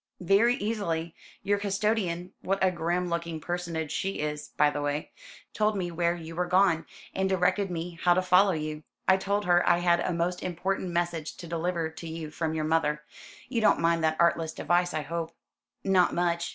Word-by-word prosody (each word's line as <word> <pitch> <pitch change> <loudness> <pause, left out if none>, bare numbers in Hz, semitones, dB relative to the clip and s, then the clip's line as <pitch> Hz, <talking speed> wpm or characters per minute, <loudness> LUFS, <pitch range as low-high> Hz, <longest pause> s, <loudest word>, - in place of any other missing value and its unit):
"Very 200 +7 +4
easily. 170 -7 -2 0.3
Your 205 0 +1
custodian 200 -3 -1
what 195 +1 0
a 185 - +4
grim 175 +1 -1
looking 170 -1 -3
personage 170 -2 -3
she 195 0 -1
is, 150 -2 -3
by 150 -1 +5
the 145 - -3
way 145 +1 -2 0.4
told 215 -1 +1
me 175 -2 -2
where 170 0 +1
you 165 -1 -8
were 180 +1 -1
gone, 180 -3 +3 0.3
and 190 0 0
directed 190 +1 +1
me 170 -1 -5
how 175 -1 +4
to 185 - +2
follow 185 +2 +5
you. 155 -1 -4 0.3
I 190 - +6
told 200 +2 -1
her 175 0 +4
I 175 - +5
had 175 0 +3
a 180 - -1
most 175 +1 -1
important 185 +1 -2
message 170 -2 -2
to 175 - -8
deliver 170 0 -1
to 160 +1 -9
you 160 -1 -6
from 160 0 -2
your 155 -1 -1
mother. 150 -1 +1 0.4
You 240 -3 -1
don't 215 - +4
mind 165 0 +2
that 155 0 +2
artless 165 -2 +2
device, 175 -1 +1
I 155 - -1
hope?" 165 +2 -4 0.5
"Not 185 -2 +3
much. 170 -1 0
175 Hz, 190 wpm, -28 LUFS, 165-185 Hz, 0.5 s, I